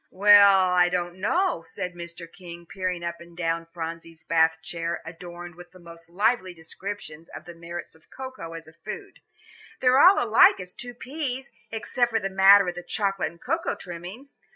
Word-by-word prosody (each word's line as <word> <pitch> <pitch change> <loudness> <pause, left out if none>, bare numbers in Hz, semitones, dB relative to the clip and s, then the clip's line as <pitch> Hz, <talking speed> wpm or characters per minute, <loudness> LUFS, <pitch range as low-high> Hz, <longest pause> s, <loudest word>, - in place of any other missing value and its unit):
"Well, 200 -1 +6
I 180 0 +4
don't 175 0 -3
know," 350 - +1
said 180 +2 -6
Mr. 170 0 -9
King, 170 0 -12
peering 180 -1 -4
up 170 0 -5
and 170 0 -15
down 165 -1 -2
Phronsie's 165 -1 -7
Bath 160 -1 +3
chair 170 0 -4
adorned 175 +1 -9
with 175 +2 -14
the 185 - -15
most 170 -1 -14
lively 185 0 0
descriptions 165 -1 -8
of - - -10
the 175 - -10
merits 170 +1 -8
of 160 - -24
cocoa 260 -11 -8
as 165 -1 -9
a 160 - -15
food; 170 - -9 0.6
"they're 255 +1 +4
all 370 +6 +8
alike 225 -2 +5
as 180 -1 -9
two 245 0 -9
peas, 265 0 -5 0.2
except 240 +2 -1
for 225 -1 0
the 195 - -3
matter 195 +1 +7
of 175 - -1
the 175 - -7
chocolate 195 +1 -1
and 170 0 -19
cocoa 335 +1 -1
trimmings. 180 +10 -10
175 Hz, 180 wpm, -25 LUFS, 170-205 Hz, 0.6 s, all